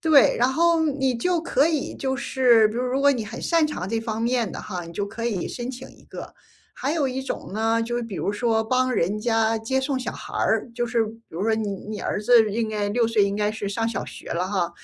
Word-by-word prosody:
对， 315 -4 +5
然 250 +2 +3
后 335 +2 +3
你 270 -3 0
就 340 +8 0
可 290 -3 +2
以 315 -4 -1
就 265 -1 -2
是， 240 -3 +4
比 215 - -7
如 245 - -1
如 255 +2 0
果 285 0 +5
你 245 -5 -1
很 220 +3 -7
擅 330 -2 +2
长 190 -12 -4
这 225 +2 0
方 225 -1 -3
面 235 -3 0
的 - - -6
哈， 180 -2 -5
你 170 - -10
就 200 +3 -2
可 230 +3 -6
以 210 -7 -1
申 245 0 -5
请 260 0 -9
一 - - -18
个。 - - -9 0.4
还 275 +3 -2
有 305 -4 +1
一 260 +1 -3
种 260 - -5
呢， 225 +1 +1
就 240 +1 -2
是 240 - -1
比 230 -4 -7
如 - - -1
说 220 +1 +1
帮 255 +3 +1
人 205 0 0
家 225 0 +1
接 245 +4 -1
送 265 0 -1
小 255 - -4
孩 - - -9
儿。 - - +1
就 240 0 -1
是 230 -2 +1
比 220 - -8 0.2
如 170 +4 -4
说 220 +1 +2
你 220 -2 -2 0.2
你 215 -1 -5
儿 - - -1
子 220 -1 +5
应 225 0 -1
该 205 -1 -1
6 235 +1 +2
岁 220 -3 +3
应 200 0 -1
该 210 0 0
是 215 -1 -5
上 225 +3 -1
小 230 - -3
学 - - -10
了 180 +2 -1
哈。 185 -3 -1
230 Hz, 275 characters per minute, -24 LUFS, 215-260 Hz, 0.4 s, 对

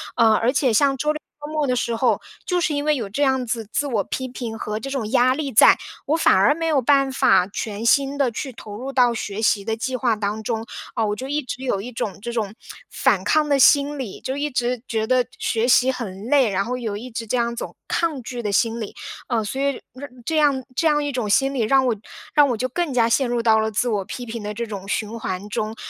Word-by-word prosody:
呃， 225 -1 +5
而 230 +3 +2
且 260 -3 +2
像 275 +4 +3
周 300 +4 +1
六 305 - -6 0.3
周 300 - -7
末 300 -3 0
的 250 - +1
时 235 -1 -1
候， 225 -2 +2 0.3
就 360 -1 +1
是 330 -3 0
因 285 0 -1
为 300 0 +2
有 230 -6 -3
这 255 +9 -3
样 265 -2 +2
子 225 -2 -3
自 290 - 0
我 220 -7 0
批 260 - -3
评 240 -3 -6
和 215 0 -4
这 275 - -6
种 240 -6 -3
压 255 0 +4
力 280 -2 -3
在， - - +7 0.3
我 315 +3 +2
反 - - +4
而 200 +10 +4
没 330 0 -3
有 300 -5 +2
办 275 +1 +3
法 220 -8 +4
全 210 +2 -5
心 275 +3 +3
地 265 -4 +2
去 260 +4 -5
投 210 -3 -10
入 260 +4 -5
到 250 -2 +3
学 210 -2 -4
习 210 -2 +2
的 220 +2 -2
计 255 +3 -2
划 240 -3 +1
当 210 +1 -3
中。 225 +1 -3 0.3
啊， 225 - +1
我 210 0 -1
就 260 +5 -6
一 295 +2 -1
直 255 +1 -6
有 245 -7 0
一 240 +5 -6
种 215 -5 -4
这 235 - -4
种 215 -4 -2 0.4
反 - - +1
抗 310 -1 +2
的 280 -2 +2
心 285 +2 +5
理， 235 -7 -6
就 260 - -4
一 290 +1 -1
直 245 -2 -1
觉 220 -1 -1
得 255 +1 +2
学 230 0 0
习 255 +1 +5
很 210 -6 -6
累， 260 -2 +4
然 195 0 0
后 250 - -2
有 220 -5 -4
一 250 +4 -8
直 230 0 -5
这 250 - 0
样 235 0 +1
一 - - -8
种 - - -6
抗 325 -5 0
拒 245 +1 -5
的 210 -3 -2
心 230 +2 +1
理。 210 - -6 0.3
呃， 230 -3 0
所 265 +6 -3
以 280 -1 0 0.5
这 320 +3 0
样 280 -4 +2
这 325 - +2
样 295 -1 +2
一 290 - -2
种 245 -5 -2
心 270 +6 +3
理， 260 - -1
让 260 +4 +3
我 240 -3 +1 0.4
让 290 -2 +5
我 240 - -1
就 255 - -1
更 345 +2 -2
加 235 -2 +3
陷 245 +2 +2
入 240 -1 0
到 220 -1 +4
了 220 - 0
自 220 +3 0
我 210 -4 0
批 245 - -6
评 230 -1 -6
的 210 0 -4
这 235 +2 -3
种 195 -3 -7
循 215 +2 -3
环 190 -1 -4
中。 215 +1 -3
245 Hz, 280 characters per minute, -22 LUFS, 220-275 Hz, 0.5 s, 在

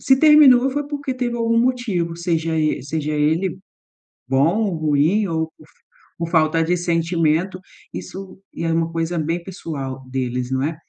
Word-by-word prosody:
se 265 - +4
terminou, 280 -4 +7
foi 290 +2 -3
porque 285 -3 -4
teve 245 -2 -2
algum 230 0 +1
motivo, 215 -10 -1
seja 165 -2 -1
e, 155 -4 0
seja 150 +2 -3
ele, 160 +5 +1 0.7
bom 140 +9 +2
ou 195 -5 -1
ruim, 155 +7 +2
ou 160 -1 -2
por 155 - -18 0.5
por 165 0 -3
falta 160 0 +2
de 175 +2 +1
sentimento, 170 +1 0 0.3
isso 190 -1 -8 0.2
é 165 0 -1
uma 165 0 0
coisa 165 +1 -2
bem 165 +3 -2
pessoal 140 -8 -6
deles, 125 -1 -3
não 130 0 0
é. 155 +3 -1
165 Hz, 160 wpm, -21 LUFS, 155-195 Hz, 0.7 s, terminou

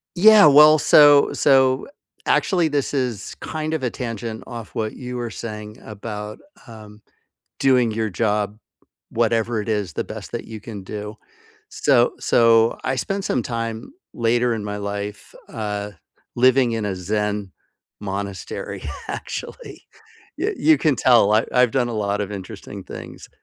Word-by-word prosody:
Yeah, 210 +1 +7
well, 150 +1 +8
so 145 -1 +6
so, 130 -1 +3 0.4
actually, 175 -4 +2
this 145 -2 -2
is 125 -7 -3
kind 155 0 -4
of 160 - -1
a 125 - +1
tangent 115 -2 -6
off 115 -3 -9
what 110 -1 -2
you 125 -1 -7
were 120 -1 -4
saying 105 -2 -8
about, 105 0 -7 0.3
um, 110 -2 -13 0.6
doing 125 -4 +3
your 110 0 -2
job, 105 +1 -1 0.5
whatever 115 0 0
it 105 - -7
is, 105 -5 -1
the - - -2
best - - -9
that - - -4
you 110 -1 -9
can 105 -2 -8
do. 105 +2 -7 0.5
So 135 - +2
so 115 -1 +4
I 130 0 -1
spent 195 +9 -3
some 125 - 0
time 115 - -5 0.2
later 120 +1 +1
in 110 -2 -5
my 105 0 -4
life, 100 0 -6 0.2
uh, 105 -1 -4 0.4
living 125 0 +4
in 110 -2 -2
a 95 -2 -3
Zen 105 +1 -2 0.5
monastery, 100 -1 -5 0.3
actually. - - -7 0.5
Y 405 +6 -1
you 315 -1 +4
can 150 -5 +2
tell. 115 -5 +4
I 110 +2 +3
I've 125 -1 +4
done 125 -3 +1
a 120 - -4
lot 105 -1 -1
of 105 0 -4
interesting 100 0 -8
things. - - -10
115 Hz, 150 wpm, -21 LUFS, 105-130 Hz, 0.6 s, well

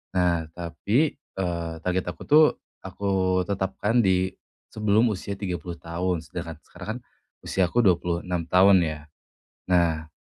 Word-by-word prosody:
Nah, 85 -3 +1
tapi, 100 - 0
eee, 85 - -4
target 90 0 0
aku, - - -11
tuh, 155 +1 +7 0.3
aku 95 -2 0
tetapkan 100 +4 0
di 95 -3 +2 0.4
sebelum 110 +2 +2
usia 100 0 -4
30 90 -4 -4
tahun, 85 +1 -3
sedangkan 80 0 -6
sekarang, 90 +1 -12
kan, - - -7 0.4
usiaku 95 +6 +1
26 90 -2 0
tahun, 95 +2 +6
ya. 80 -3 -1 0.7
Nah, 85 -3 +2
90 Hz, 125 wpm, -25 LUFS, 85-100 Hz, 0.7 s, tuh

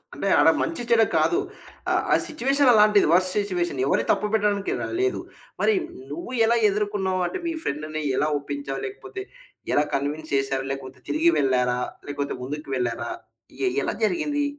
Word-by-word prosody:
అంటే - - -3
ఆడ - - +6
మంచిచెడ 240 -8 +2 0.2
కాదు. 350 - +2 0.5
ఆహ్, - - +2
ఆ - - +7
సిట్యుయేషన్ 280 -3 +3
అలాంటిది 210 -1 +5
వర్స్ట్ 185 +1 +4
సిట్యుయేషన్. 175 -8 -1
ఎవరి 140 - +2
తప్పుపెట్టడానికి 210 -1 0
ర - - -3 0.2
లేదు. 390 0 0 0.4
మరి 440 - +4 0.4
నువ్వు 340 -6 -6
ఎలా 235 +1 +3
ఎదుర్కన్నావు? 200 -2 -1
అంటే 375 - -5
మీ 335 - -1
ఫ్రెండ్‌ని 155 +2 -3
ఎలా 150 - +1
ఒప్పించావు? 140 -1 -5
లేకపోతే 390 -1 -7 0.5
ఎలా 145 - +4
కన్విన్స్ 145 +2 -3
చేశారు? 135 -1 0
లేకపోతే 135 -1 -7
తిరిగి 335 +2 +3
వెళ్లారా? 125 -2 +1 0.3
లేకపోతే 145 0 -3
ముందుకు 150 +3 -6
వెళ్లారా? 125 - -2 0.5
ఎ - - +2 0.2
ఎలా - - -1
జరిగింది? 295 +1 0
185 Hz, 150 wpm, -24 LUFS, -, 0.5 s, ఆ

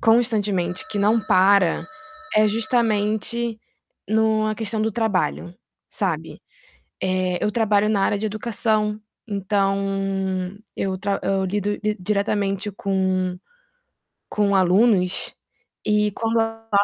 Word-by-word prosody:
constantemente, 210 -6 +1
que 210 - -3
não 215 +3 +3
para, 185 -4 +4 0.5
é 215 0 +5
justamente 225 0 0 0.5
no 220 0 +2
a 215 - 0
questão 220 0 -2
do 220 - +1
trabalho, 90 - -1 0.4
sabe. - - -3 0.6
Eh, 185 -1 0
eu 210 - +2
trabalho 210 -2 +2
na 205 -2 +2
área 205 - +1
de 215 - -2
educação, 215 0 -1 0.3
então, 200 -1 0 1.0
eu 190 -1 -2
tra 200 +1 -1
eu 195 0 0
lido 205 +2 -1
di 215 0 -1
diretamente 200 +1 -1
com 190 -2 -1 0.9
com 205 -1 +1
alunos 185 0 +3 0.5
e 210 0 +2
quando 225 +2 0
a 225 0 -3
210 Hz, 115 wpm, -22 LUFS, 195-220 Hz, 1.0 s, é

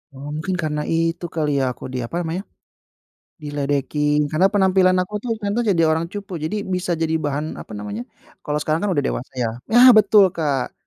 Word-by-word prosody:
"Oh, 140 +2 -8
mungkin 160 +4 -2
karena 150 -2 -2
itu 165 +1 0
kali 150 -3 0
ya, 130 -1 0
aku - - -11
di, 130 - -2
apa 170 +9 -3
namanya, 175 +3 -3 1.0
diledekin." 145 0 0
Karena 180 +5 +4
penampilan 190 -2 +4
aku 185 +3 -6
tuh 245 - -3
ternyata 205 +3 0
jadi 170 - +2
orang 160 +1 +1
cupu. 200 -3 -6
Jadi, 200 +7 -2
bisa 180 -1 -1
jadi 160 0 0
bahan, 150 +2 -2
apa - - -14
namanya? 105 +2 -5 0.4
Kalau 150 0 -1
sekarang 155 +2 0
kan - - 0
udah 145 - +2
dewasa 130 - -7
ya. 120 -2 0 0.2
Nah, 245 +3 +8
betul, 205 -2 +6
Kak! 145 -5 -1
160 Hz, 190 wpm, -21 LUFS, 145-185 Hz, 1.0 s, Nah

